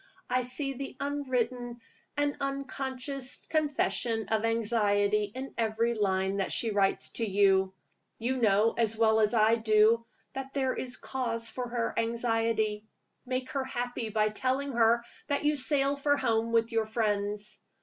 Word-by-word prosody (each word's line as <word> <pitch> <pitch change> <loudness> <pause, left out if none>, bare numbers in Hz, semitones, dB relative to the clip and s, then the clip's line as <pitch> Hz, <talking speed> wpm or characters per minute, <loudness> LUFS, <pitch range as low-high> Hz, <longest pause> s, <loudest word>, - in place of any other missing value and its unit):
"I 255 - +3
see 275 +3 -2
the 270 +1 -7
unwritten 250 -4 -2 0.4
and 290 0 +1
unconscious 275 -1 -3
confession 250 -8 0
of 220 0 +1
anxiety 210 -2 +2
in 265 +1 -6
every 230 +1 +1
line 195 -2 0
that 195 - -1
she 230 - 0
writes 200 -1 +1
to 225 -3 -1
you. 190 -1 +3 0.5
You 250 +3 -1
know, 220 -1 +3
as 225 -1 0
well 220 -1 +4
as 215 +2 +2
I 220 +1 +4
do, 220 +1 +4 0.3
that 270 0 -6
there 265 -2 +1
is 250 -1 -3
cause 230 -3 -3
for 250 0 -4
her 235 -1 -1
anxiety. 225 -2 0 0.4
Make 255 0 -2
her 270 0 -1
happy 245 -3 -3
by 215 0 +2
telling 260 +5 -1
her 235 -1 +3 0.2
that 285 0 0
you 300 0 +3
sail 275 0 +2
for 285 +1 +2
home 230 -3 0
with 230 0 +2
your 225 -1 0
friends. 210 -2 -1
230 Hz, 150 wpm, -29 LUFS, 220-260 Hz, 0.5 s, well